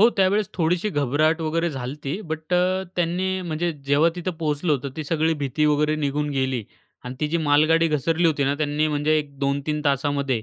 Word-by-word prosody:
हो, 225 - +8
त्यावेळेस 195 +2 +2
थोडीशी 175 +4 +1
घबराहट 150 +3 +1
वगैरे 165 +1 0
झाली 130 -2 -5
होती, 150 +6 -5
बट 160 +2 -5
अ, 185 +1 +2
त्यांनी 185 +2 0
म्हणजे 170 0 -2 0.2
जेव्हा 145 +4 +4
तिथं 175 +1 -2
पोहोचलो 150 +1 0
होतो, 140 0 -1
ती 155 - -4
सगळी 160 +1 +1
भीती 140 +3 0
वगैरे 150 +1 +2
निघून 150 +1 -1
गेली 130 -5 -1 0.4
आणि 125 +1 -6
ती 150 - 0
जी 170 - 0
मालगाडी 160 +3 +4
घसरली 160 +3 +1
होती 145 -3 +1
ना, 140 +1 +1
त्यांनी 150 +1 0
म्हणजे 150 +1 +1
एक 140 -2 -7
2-3 140 +2 -1
तासामध्ये 140 -3 0
155 Hz, 190 wpm, -23 LUFS, 140-165 Hz, 0.4 s, हो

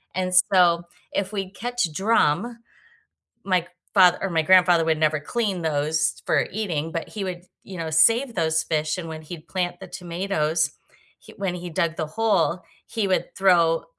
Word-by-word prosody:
and 185 0 -1 0.2
so, 175 -2 +4 0.3
if 200 +1 -2
we 195 -2 -3
catch 245 -6 -2
drum 210 +3 +1 0.9
my 185 -3 +2
c - - -17 0.3
father 185 -2 +6
or 195 - -1
my 165 -1 +1
grandfather 175 -1 +5
would 160 -1 +1
never 155 -1 +2
clean 200 0 -2
those 155 0 0
for - - +2
eating, 165 -7 -3
but 165 - -4
he 205 -3 -5
would, 180 -2 -5 0.2
you 190 -2 -9
know, 160 -1 -4
save 230 - +3
those 160 -1 +1
fish, 155 -1 -1
and 165 -2 -5
when 160 0 -7
he'd 155 0 -10
plant 175 -2 -3
the - - -8
tomatoes, 170 -3 -1 0.5
he - - -16
when 195 -3 -2
he 175 0 -7
dug 165 -1 -1
the 155 - -2
hole, 185 -3 +1 0.3
he 210 -4 -2
would 185 - -1
throw 170 -4 +3
175 Hz, 175 wpm, -23 LUFS, 160-195 Hz, 0.9 s, father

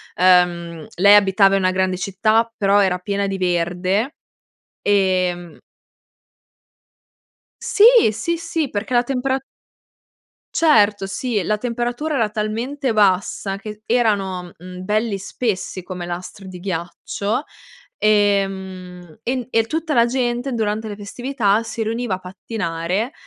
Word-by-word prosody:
Ehm, 175 -3 +2
lei 200 +3 +7
abitava 195 -1 +4
i - - +3
una 185 -1 +2
grande 185 0 0
città, 215 +4 +1
però 200 0 +3
era 185 -2 +2
piena 200 +2 -2
di 195 0 -3
verde 185 - 0 0.7
e 185 -3 +2
mhmm 175 -2 -12 2.1
Sì! 410 - +2 0.3
Sì, 335 +11 -2
sì, 330 -3 -2
perché 220 +4 -2
la 240 - +4
tempera 265 +1 -1 1.2
Certo, 210 -11 +4
sì. 210 +2 -2
La 210 +4 0
temperatura 245 +6 -2
era 225 -5 +1
talmente 230 +6 -2
bassa 195 -1 +1
che 210 +1 -9
erano, 195 -7 0
mhmm, 180 +1 -9
belli 210 +1 0
spessi 195 -1 -3
come 180 -1 -7
lastri 180 +2 -7
di 180 -1 -9
ghiaccio 190 - -3 0.5
e, 205 -2 +3
mhmm, 185 -2 -9
en 250 -1 -2
e 225 -2 +2
tutta 320 +6 -3
la 235 -3 +5
gente, 245 +1 -1
durante 220 -2 -2
le 205 - -7
festività, 220 0 0
si 225 0 -5
riuniva 225 -2 -2
a - - -10
pattinare 185 - -3
205 Hz, 130 wpm, -20 LUFS, 185-230 Hz, 2.1 s, lei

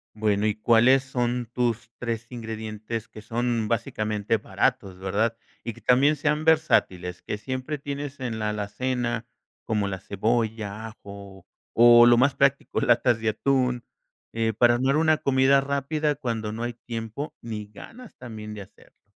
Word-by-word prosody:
Bueno, 105 -1 +1
¿y 105 - +2
cuáles 120 +4 +4
son 125 -2 -2
tus 120 -2 -1
3 115 -1 -4
ingredientes 110 -1 -6
que 110 - -12
son 120 -2 -1
básicamente 110 -1 -1
baratos?, 100 -1 -1
¿verdad?, 105 +4 0 0.3
¿y 115 - -4
que - - -16
también 135 +5 +4
sean 150 +1 0
versátiles, 95 - +2
que 105 - -4
siempre 130 +5 -4
tienes 140 0 -6
en 120 -4 -3
la 105 -1 -1
alacena, 120 +3 -2 0.4
como 105 -3 0
la 95 -1 -4
cebolla, 110 +1 -2
ajo, 100 -3 -11 0.3
o 120 0 +8
lo 120 0 +6
más 135 +2 +3
práctico, 140 0 +1
latas 120 -1 +3
de 115 - +1
atún, 125 +1 0 0.5
eh, 115 0 0
para 120 +2 +4
armar 135 +4 +2
una 155 -1 +3
comida 135 0 +3
rápida 140 +2 -1
cuando 115 -6 -3
no 110 +2 -6
hay 120 0 -2
tiempo 115 +5 -6
ni 110 -2 -5
ganas 225 - -13
también 110 -3 -8
de 105 - -7
hacerlo? 95 - -18
115 Hz, 155 wpm, -25 LUFS, 110-130 Hz, 0.5 s, o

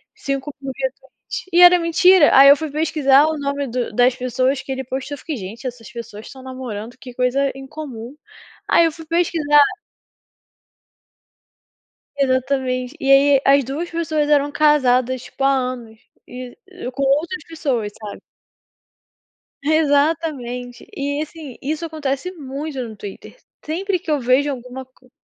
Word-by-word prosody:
5.000 275 -6 -5
retweets, - - -6
e 350 - +6
era 355 0 +9
mentira. 340 0 +5
Aí 275 +1 +9
eu 280 - +9
fui 315 -3 -5
pesquisar 295 -2 +3
o 315 -1 -2
nome 280 -1 -2
do 240 -2 -3
das 245 +2 +3
pessoas 255 +1 0
que 270 - -8
ele 265 0 -3
postou, 265 +3 -5
eu - - -14
fiquei: 310 0 -5
"Gente, 220 +6 -7
essas 235 -4 -9
pessoas 230 -2 -9
estão 265 - -12
namorando? 250 -3 -7
Que 250 -1 -11
coisa 255 +3 +1
incomum". 270 -3 -8 0.5
Aí 335 - +5
eu 325 - +1
fui 325 +1 -12
pesquisar. 320 -3 +3 2.5
Exatamente. 260 -1 -1
E 270 - +1
aí 275 0 +6
as 275 0 +5
duas 290 +7 -4
pessoas 310 -3 -1
eram 290 -1 +3
casadas, 260 -4 +2
tipo, 270 - -7
há 275 - +5 0.2
anos 230 -3 -10 0.3
e 250 0 -9 0.4
com 275 +2 -3
outras 305 +5 0
pessoas, 270 -10 -2
sabe? 210 -2 -9 1.4
Exatamente. 285 -5 0
E 285 +1 -2
assim, 305 -4 -8
isso 310 +4 -3
acontece 305 +1 -3
muito 285 -2 -6
no 220 - -10
Twitter. 200 - -10 0.3
Sempre 365 +4 -1
que 335 - -10
eu 295 - +2
vejo 260 +3 +2
alguma 255 0 -7
co 255 0 -27
275 Hz, 145 wpm, -20 LUFS, 255-305 Hz, 2.5 s, era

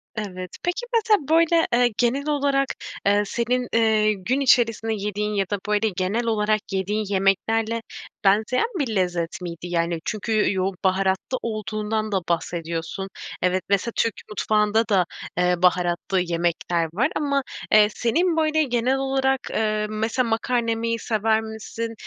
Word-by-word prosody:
Evet. 185 -4 -5
Peki, 355 +7 -1
mesela 430 - +2
böyle, 330 +1 +4
eee, 240 -1 +3
genel 260 +4 +1
olarak, 280 -2 +1 0.4
eee, 205 +1 +4
senin, 245 +3 -1
eee, 220 -2 +3
gün 220 +7 -1
içerisinde 230 -4 +3
yediğin 210 0 -2
ya 200 -1 +1
da, 205 - -1
böyle, 210 +1 +2
genel 195 +5 -1
olarak 215 -1 +1
yediğin 205 +3 -1
yemeklerle 220 +4 +1 0.4
benzeyen 215 - +3
bir 245 -7 -1
lezzet 175 -2 -1
miydi? 170 -1 -6
Yani, 170 -1 0
çünkü 215 0 0
yoğun 190 0 -1
baharatlı 190 +5 +1
olduğundan 215 0 -3
da 195 - +2
bahsediyorsun. 170 +2 -3 0.3
Evet, 180 0 +1
mesela 200 +4 +1
Türk 230 - +1 0.2
mutfağında 210 +1 +1
da, 195 -5 +3 0.3
eee, 180 0 +3
baharatlı 180 +1 +1
yemekler 170 -1 -1
var 235 +9 +2
ama, 280 -2 0 0.3
eee, 210 -1 +7
senin 325 +9 +1
böyle 315 0 +2
genel 250 0 +1
olarak, 270 0 +1
eee, 215 -1 0
mesela 220 +3 -1
makarna 230 +1 0
yemeyi 230 0 -1
sever 220 0 +1
misin? 220 +1 -6
215 Hz, 140 wpm, -23 LUFS, 190-240 Hz, 0.4 s, eee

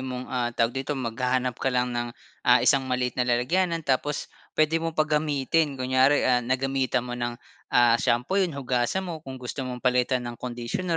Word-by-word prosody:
mong, 130 -1 -5
ah, 125 -2 0
tawag 115 +1 +2
dito 135 +2 -3
maghahanap 125 +1 -1
ka - - +1
lang 125 -1 0
ng, 120 0 -2 0.4
ah, - - +6
isang 135 -1 +3
maliit 125 -1 0
na 125 0 -1
lalagyanan 165 +8 +1
tapos 140 +2 -1 0.2
puwede 155 +1 +3
mo 165 -1 -3
pa 155 - +4
gamitin 150 -1 +1
kunyari, 130 +2 +3
ah, 125 -1 +3
nagamitan 130 0 0
mo 125 - -6
ng, 120 -1 -3 0.3
ah, 120 -1 +4
shampoo 125 +12 +1
'yon 170 -7 -1
hugasan 130 +7 0
mo 170 -3 -5
kung 135 -3 -8
gusto 125 +2 -6
mong 125 0 -7
palitan 125 0 +2
ng 120 -1 -7
conditioner 125 +8 -3
130 Hz, 185 wpm, -26 LUFS, 125-145 Hz, 0.4 s, ah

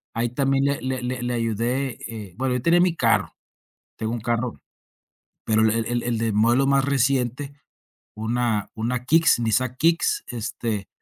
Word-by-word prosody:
ahí, 120 +1 0
también 135 +2 +1
le 140 0 0
le 130 0 -3
le 125 0 -3
le 120 0 -1
ayudé. 120 +3 -1
Eh, 105 -5 -8
bueno, 130 -1 0
yo 125 - -1
tenía 170 +3 +4
mi 180 -2 +2
carro. - - +1 0.6
Tengo 110 0 -3
un 120 - -4
carro. 120 +1 -1 0.9
Pero 110 0 +2
el 110 - +4
el 115 0 0
el 120 0 -1
el 120 -1 -1
de 115 0 0
modelo 120 +6 +3
más 140 -1 +3
reciente, 135 0 0 0.6
una 110 -1 -1
una 120 +2 -2
Kicks, 160 -1 +4
Nissan 120 +2 0
Kicks, 170 - +2
este, 110 -3 -4
120 Hz, 170 wpm, -23 LUFS, 115-135 Hz, 0.9 s, tenía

